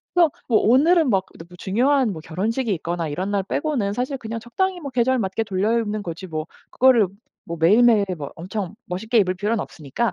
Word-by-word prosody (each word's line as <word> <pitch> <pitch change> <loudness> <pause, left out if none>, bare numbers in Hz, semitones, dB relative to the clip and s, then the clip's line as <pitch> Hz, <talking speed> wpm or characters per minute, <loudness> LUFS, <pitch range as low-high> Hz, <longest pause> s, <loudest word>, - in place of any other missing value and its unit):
그래서 340 -3 +5 0.2
뭐 230 - +4
오늘은 305 - +4
막 195 -5 +2
너무 170 +2 -12
중요한 245 +6 +1
뭐 160 - -7
결혼식이 215 +10 -2
있거나 170 0 -3
이런 180 +7 -3
날 200 -1 0
빼고는 245 -3 -1
사실 255 +4 -2
그냥 230 -1 -5
적당히 370 - -2
뭐 285 -4 -6
계절 255 +1 +2
맞게 200 +1 -1
돌려입는 210 +2 0
거지 170 +1 -6
뭐 155 -2 -4 0.2
그거를 250 -5 +4 0.4
뭐 170 - -5
매일매일 215 +5 +5
뭐 140 -2 -6
엄청 190 +3 -5
멋있게 220 +6 0
입을 185 -3 +2
필요는 210 +4 -1
없으니까 165 - -3
215 Hz, 410 characters per minute, -22 LUFS, 185-245 Hz, 0.4 s, 그래서